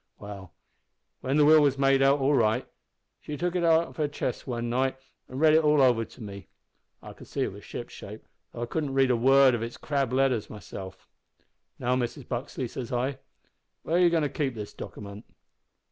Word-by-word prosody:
"Well, 100 -3 -10 0.6
when 135 +3 -1
the 150 - +5
will 155 +1 +7
was 140 -2 +2
made 135 0 +3
out 135 +1 +5
all 135 +2 +2
right, 115 -1 +2 0.5
she 150 - -6
took 175 +2 -2
it 180 - 0
out 165 0 +5
of - - -14
her 150 -2 +1
chest 140 -3 -4
one 120 -2 -3
night 130 +3 0 0.3
an' 130 - -7
read 155 +1 +5
it 160 +1 +5
all 150 -1 +4
over 125 -4 +4
to 120 - -13
me. 100 -4 -9 0.6
I - - -9
could - - -14
see - - -4
it - - 0
was - - -12
shipshape, - - -9 0.3
though 120 - -5
I - - -1
couldn't 140 +1 -3
read 135 -1 +4
a - - +3
word 135 +2 +5
of 120 - -1
its 115 +1 -5
crabbed 140 -4 -1
letters 130 -4 +1
myself. 95 -2 -9 0.7
"`Now 125 0 +1
Mrs 120 -1 -4
Buxley,' 125 0 -4
says 120 +1 -7
I, 130 +2 -1 0.7
`where - - -6
are 170 - +4
you 175 -1 +6
goin' 165 -2 +1
to 145 - 0
keep 135 -4 -2
that 105 -2 -7
dockiment?' 100 +1 -9
130 Hz, 205 wpm, -27 LUFS, 120-145 Hz, 0.7 s, will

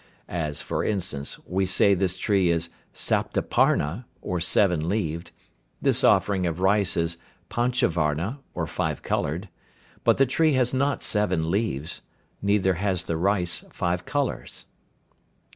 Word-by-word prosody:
As, 75 -4 -3
for - - -2
instance, 90 -9 -2
we 95 +1 0
say 100 +2 +4
this 95 -1 0
tree 95 -2 +2
is 85 0 0 0.2
"Saptaparna," 85 - +1
or 90 - -3
seven 85 -2 +2
leaved, 85 -4 -2 0.5
this - - +2
offering 95 -3 +3
of 85 +1 -3
rice 95 0 +2
is 85 0 0 0.3
"Panchavarna," 95 - 0 0.2
or - - -1
five - - -3
coloured, 85 +8 -1 0.6
but - - +4
the 135 - +5
tree 155 +4 +2
has 125 -1 +2
not 140 +2 0
seven 95 -6 +1
leaves, 90 -7 -2 0.4
neither 100 -2 +2
has 95 0 -1
the 85 - -2
rice 90 0 +1
five 90 +1 -1
colours. 145 -2 -3
95 Hz, 130 wpm, -25 LUFS, 85-105 Hz, 0.6 s, the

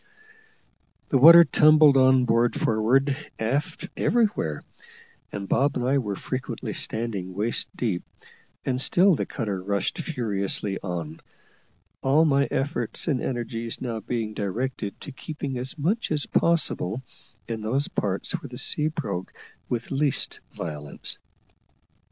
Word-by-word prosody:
The 135 - +3
water 170 +5 +10
tumbled 155 -3 +6
on 130 -1 +5
board 115 +1 +2
forward, 130 +6 +2 0.2
aft, 145 +10 -2
everywhere, 205 - +1 0.7
and 100 -1 -5
Bob 140 +7 +2
and 125 - -2
I 140 +1 +3
were 105 -6 -3
frequently 125 -2 -5
standing 105 -5 -2
waist 110 +4 -1
deep; 100 -8 -1 0.6
and 130 -1 0
still 185 +7 +4
the - - -1
cutter 105 -7 -3
rushed 100 - -2
furiously 105 - -1
on, 85 -4 -5 0.8
all 145 +4 +4
my 140 -2 +3
efforts 135 -2 -2
and 140 -6 +1
energies 115 -2 -3
now 115 -3 -3
being 110 -1 -3
directed 105 +1 -3
to 145 - -7
keeping 140 -2 -5
as 130 +5 -6
much 190 +11 0
as 150 -1 0
possible 130 - +1 0.4
in 115 -2 -4
those 130 +7 0
parts 100 -2 -2
where 140 - -4
the 125 - -9
sea 150 +3 +1
broke 150 - -4 0.4
with 120 -1 -3
least 140 0 0
violence. 75 -3 -6
125 Hz, 130 wpm, -25 LUFS, 105-145 Hz, 0.8 s, water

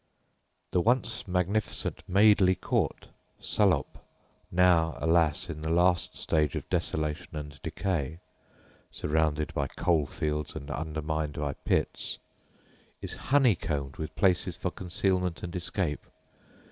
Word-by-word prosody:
The 90 - +3
once 115 0 +1
magnificent 90 +4 -1
Madeley 100 -1 +5
Court, - - -1 0.3
Salop 90 -10 +1 0.5
(now, 85 -4 +3
alas! 80 +1 +2
in 80 -3 -6
the 80 - -2
last 90 +1 +2
stage 75 -3 +1
of - - -4
desolation 75 +2 -2
and 75 -1 -7
decay, 80 -5 -2 0.7
surrounded 75 -1 0
by 70 -1 0
coal 80 0 +1
fields 75 0 -3
and 70 +2 -6
undermined 75 +1 -2
by 75 -2 -2
pits), - - -1 0.8
is - - -5 0.2
honeycombed 85 - +2
with 80 - -5
places 95 -3 +2
for - - -2
concealment 90 -1 -1
and 85 0 -5
escape. 85 -3 -2
80 Hz, 115 wpm, -29 LUFS, 75-90 Hz, 0.8 s, Madeley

